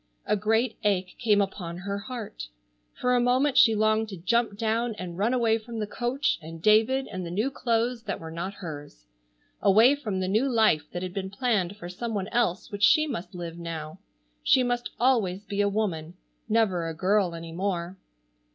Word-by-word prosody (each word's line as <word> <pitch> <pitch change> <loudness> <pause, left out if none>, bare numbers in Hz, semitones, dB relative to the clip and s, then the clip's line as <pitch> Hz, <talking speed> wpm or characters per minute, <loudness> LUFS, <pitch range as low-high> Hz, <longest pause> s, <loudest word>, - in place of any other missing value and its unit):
A - - +2
great 225 +4 +1
ache 190 -3 +1
came 210 -4 +3
upon 180 -3 -4
her 200 +2 -4
heart. 220 - -7 0.5
For 250 0 +1
a - - +4
moment 255 +3 +2
she 225 -2 +6
longed 215 +1 +2
to 195 - -7
jump 225 +4 0
down 225 +1 0
and 180 -3 -6
run 205 +6 +1
away 230 -3 +2
from 230 +1 -8
the 215 - -1
coach 245 +6 -1
and 165 +1 -9
David 220 +8 +3
and 185 -2 -4
the 170 - -5
new 215 +10 -1
clothes 235 -1 0
that 200 - -3
were 160 0 -8
not 180 +4 -5
hers. 145 - -9 0.6
Away 220 +7 +6
from 220 -10 -3
the 185 - -1
new 220 +8 +2
life 215 -11 +3
that 175 +1 -4
had 180 -1 -5
been 190 -1 -3
planned 200 -3 0
for 175 - -8
some 220 +5 -4
one 195 0 -2
else 220 -7 0
which 205 -1 -6
she 310 +9 +6
must 225 - -5
live 170 -1 -6
now. 165 0 -6 0.4
She 260 - +4
must 245 0 -1
always 215 -6 +2
be 200 0 -1
a 205 - +2
woman, 180 -6 -2 0.3
never 200 -7 +2
a 165 - -5
girl 185 0 +1
any 165 0 -8
more. 180 0 -2
205 Hz, 195 wpm, -27 LUFS, 180-230 Hz, 0.6 s, she